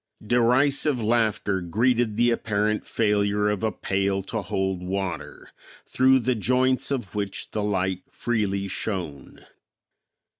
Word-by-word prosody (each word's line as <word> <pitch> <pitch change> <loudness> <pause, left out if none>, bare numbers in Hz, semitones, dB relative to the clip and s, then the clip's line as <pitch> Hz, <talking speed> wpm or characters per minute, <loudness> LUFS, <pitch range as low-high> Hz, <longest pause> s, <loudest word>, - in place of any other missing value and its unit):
Derisive 125 +4 +3
laughter 110 -4 +1
greeted 115 +5 +1
the 120 +1 +4
apparent 105 -2 -1
failure 105 -1 +1
of 105 0 -2
a 110 - +1
pail 95 0 -1
to 110 +3 -3
hold 95 -1 -2
water, 90 -6 -5 0.3
through 130 +1 +4
the 130 0 +1
joints 125 +3 +1
of 125 -9 -3
which 100 -2 -4
the 105 - -2
light 95 -2 -1
freely 100 -4 -1
shone. 90 -8 -5
105 Hz, 120 wpm, -25 LUFS, 95-120 Hz, 0.3 s, the